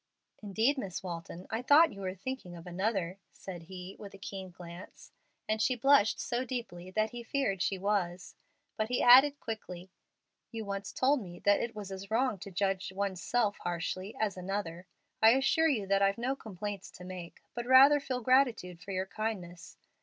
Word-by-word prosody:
"Indeed, 225 +7 +1
Miss 190 -6 -5
Walton, 170 0 -6
I 225 +1 -1
thought 300 +5 +6
you 200 - -9
were 185 -1 -3
thinking 195 -3 -6
of 170 0 -11
another," 185 0 -2
said 180 -3 -8
he, 185 +1 -8
with 200 -1 -9
a - - -11
keen 195 -1 -7
glance, 175 +1 -11 0.4
and 215 0 0
she 255 - +2
blushed 245 -3 +4
so 245 0 -1
deeply 230 -9 -6
that 215 +3 0
he 240 - -6
feared 230 -6 -1
she 195 - 0
was; 185 -2 -1 0.4
but 215 0 -1
he 250 - +1
added, 270 +4 +8
quickly, 185 -5 -7 0.6
"You 225 -1 -5
once 200 0 -4
told 270 +1 +2
me 175 -3 -9
that 205 0 +5
it 235 -1 -3
was 205 -2 -7
as 195 +1 -7
wrong 230 -2 +1
to 200 - -8
judge 195 0 -1
one's 190 -1 -2
self 230 -4 0
harshly 180 +3 -3
as 205 -4 0
another. 185 -2 -4 0.3
I 220 +1 +8
assure 320 +5 +3
you 225 -9 0
that 195 +1 +2
I've 195 +1 +3
no 255 +3 -1
complaints 205 -4 -6
to 180 - -11
make, 180 -2 -8
but 240 0 -5
rather 270 +3 +8
feel 255 -3 -3
gratitude 230 -9 +2
for 200 - -12
your 190 -1 -1
kindness. 190 -5 -5
200 Hz, 185 wpm, -31 LUFS, 185-240 Hz, 0.6 s, added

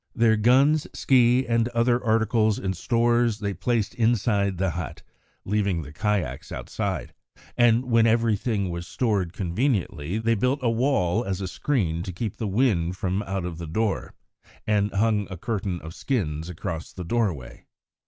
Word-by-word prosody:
Their 115 -2 +4
guns, 135 +8 +4
ski, 125 0 +3
and 115 -1 +1
other 120 +1 +2
articles 110 -1 +2
and 95 -1 -2
stores, 120 -1 +2
they 100 -2 -3
placed 105 +3 -1
inside 105 -4 +1
the 95 0 0
hut, 85 -1 -6 0.4
leaving 100 -4 0
the 70 +1 -11
kayaks 90 - -2
outside; - - -4 0.4
and 120 +1 +4
when 115 -2 +4
everything 110 -3 +1
was 85 0 -5
stored 100 -8 0
conveniently, 95 - -1
they 115 +1 +1
built 125 +6 +1
a 115 - +2
wall 115 -5 +1
as 95 -4 -3
a 95 - -3
screen 90 - -1
to 95 +1 -5
keep 105 +4 -4
the 110 - -2
wind 95 -5 +1
from 95 +1 -1
out 95 -2 -2
of 85 -2 -5
the 85 - -6
door, 105 +5 -2 0.5
and 105 -1 +1
hung 105 0 +1
a 95 - -6
curtain 95 -2 -3
of 80 +1 -8
skins 80 - -2
across 80 -1 -5
the 90 - -7
doorway. 90 - -2
105 Hz, 160 wpm, -25 LUFS, 90-115 Hz, 0.5 s, Their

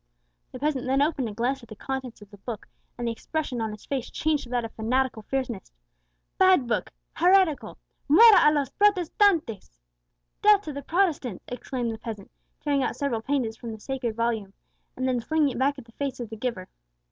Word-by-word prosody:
The - - -7
peasant 275 -1 -1
then 265 +1 +2
opened 285 -5 0
and 210 -1 -8
glanced 260 +3 0
at 235 - -15
the 215 - -9
contents 260 -2 -5
of 200 - -19
the 205 - -13
book, 220 0 -7 0.3
and 240 - -3
the - - +1
expression 260 +1 -3
on 220 - -1
his 210 - -10
face 265 -3 -3
changed 310 -3 0
to - - -13
that 245 -1 -1
of 225 - -7
fanatical 245 +1 0
fierceness. 245 -4 -4 0.7
"Bad 370 -8 +5
book 235 - -1 0.2
heretical 360 -3 +3 0.3
muera 385 0 +8
a - - +1
los 290 -3 0
Protestantes!" 355 - +2 0.6
(death 415 -1 +6
to 305 - -6
the 280 - -5
Protestants!) 305 - 0
exclaimed 245 -1 -3
the 220 - -7
peasant, 215 -4 -7 0.3
tearing 285 -2 +1
out - - -1
several 260 -6 -1
pages 245 -3 -1
from 230 -2 -7
the 220 - -9
sacred 255 -2 -3
volume, 225 -4 -1 0.4
and 260 0 -1
then 255 -1 +1
flinging 305 +4 +1
it 250 - -5
back 280 +2 +2
at 265 - -10
the 230 - -18
face 275 +2 -4
of 235 -2 -6
the - - -5
giver. 215 -5 -4
255 Hz, 200 wpm, -26 LUFS, 230-295 Hz, 0.7 s, muera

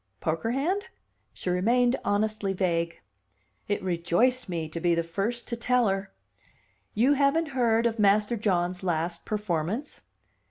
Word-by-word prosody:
"Poker 165 +7 -1
hand?" 325 - 0 0.5
She 180 - -4
remained 240 +7 +3
honestly 205 -1 0
vague. 170 -3 -1 0.7
It 205 - -1
rejoiced 185 +8 +1
me 165 -3 -2
to 160 +2 -6
be 170 0 +2
the 170 - 0
first 200 +8 -3
to 235 - -1
tell 240 0 +2
her. 195 +1 -2 0.8
"You 250 +7 +4
haven't 285 +3 +2
heard 235 -3 +2
of 230 -1 0
Master 210 +3 +3
John's 180 -4 0
last 170 -1 -2
performance? 210 - -3
205 Hz, 135 wpm, -27 LUFS, 175-240 Hz, 0.8 s, You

